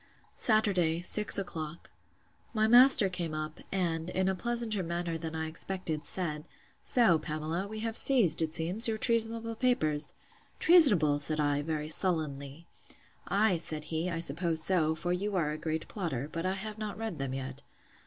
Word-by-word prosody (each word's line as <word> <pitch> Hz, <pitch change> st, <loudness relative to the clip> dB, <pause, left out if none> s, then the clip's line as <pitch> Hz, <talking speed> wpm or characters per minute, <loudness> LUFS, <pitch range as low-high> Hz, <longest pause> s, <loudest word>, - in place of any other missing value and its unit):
Saturday, 195 Hz, -7 st, +1 dB
six 210 Hz, +4 st, +2 dB
o'clock. 165 Hz, -4 st, -7 dB, 0.6 s
My 215 Hz, 0 st, +1 dB
master 245 Hz, -2 st, +6 dB
came 175 Hz, -4 st, -6 dB
up, 155 Hz, +1 st, -7 dB
and, 170 Hz, -3 st, -3 dB
in 185 Hz, +1 st, -2 dB
a 190 Hz, -, 0 dB
pleasanter 230 Hz, 0 st, -2 dB
manner 170 Hz, -1 st, -5 dB
than 160 Hz, -1 st, -7 dB
I 160 Hz, 0 st, -4 dB
expected, 160 Hz, -1 st, -5 dB
said, 155 Hz, -4 st, -5 dB, 0.4 s
So, 220 Hz, -10 st, +1 dB
Pamela, 155 Hz, +6 st, -5 dB
we 215 Hz, +1 st, -8 dB
have 225 Hz, 0 st, -4 dB
seized, 220 Hz, -, +5 dB
it 160 Hz, -1 st, -3 dB
seems, 180 Hz, +9 st, +6 dB
your 220 Hz, -1 st, -3 dB
treasonable 230 Hz, 0 st, -2 dB
papers? 155 Hz, -, -1 dB, 0.4 s
Treasonable! 205 Hz, -, +8 dB
said 155 Hz, +2 st, +2 dB
I, 145 Hz, -1 st, -1 dB
very 155 Hz, 0 st, -5 dB
sullenly. 155 Hz, -3 st, -3 dB, 0.6 s
Ay, 200 Hz, -2 st, 0 dB
said 155 Hz, -2 st, -6 dB
he, 165 Hz, +3 st, -3 dB
I 165 Hz, -1 st, -5 dB
suppose 165 Hz, +1 st, -1 dB
so; 160 Hz, -4 st, +1 dB
for 175 Hz, +2 st, -4 dB
you 200 Hz, +3 st, -4 dB
are 160 Hz, -5 st, -2 dB
a 150 Hz, -, -6 dB
great 160 Hz, -1 st, -5 dB
plotter: 155 Hz, -, -6 dB
but 165 Hz, +2 st, -5 dB
I 185 Hz, -, -2 dB
have 210 Hz, +2 st, -8 dB
not 215 Hz, -1 st, -7 dB
read 220 Hz, -8 st, -7 dB
them 135 Hz, -1 st, -5 dB
yet. 130 Hz, +1 st, -8 dB
170 Hz, 165 wpm, -28 LUFS, 155-210 Hz, 0.6 s, Treasonable